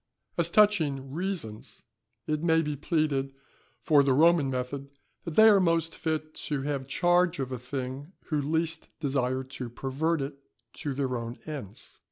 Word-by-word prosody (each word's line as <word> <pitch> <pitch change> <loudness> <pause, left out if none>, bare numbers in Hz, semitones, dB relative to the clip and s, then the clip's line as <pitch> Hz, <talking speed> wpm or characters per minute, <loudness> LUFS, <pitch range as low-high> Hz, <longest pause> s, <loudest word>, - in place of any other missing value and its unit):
As 170 -1 +1
touching 160 -10 +3
reasons, 165 - -5 0.4
it 155 0 -1
may 165 -1 +3
be 150 -1 -2
pleaded 145 -3 0 0.5
for 150 -3 +5
the 135 -1 +3
Roman 160 -1 +5
method, 135 +2 -4 0.4
that 165 -3 -5
they 220 - +8
are 205 -2 +7
most 165 -2 +1
fit 155 -1 -2 0.2
to 145 -3 -1
have 140 -2 -2
charge 175 +4 +2
of 130 -2 -3
a 130 - -3
thing, 130 +4 -5 0.2
who 150 -3 +1
least 160 +2 -1
desire 130 -3 0
to 130 -2 -7
pervert 140 +6 -1
it 140 0 -7 0.4
to 145 -3 -3
their 130 -2 -1
own 115 +1 -5
ends. 130 -10 -8
145 Hz, 160 wpm, -28 LUFS, 135-165 Hz, 0.5 s, they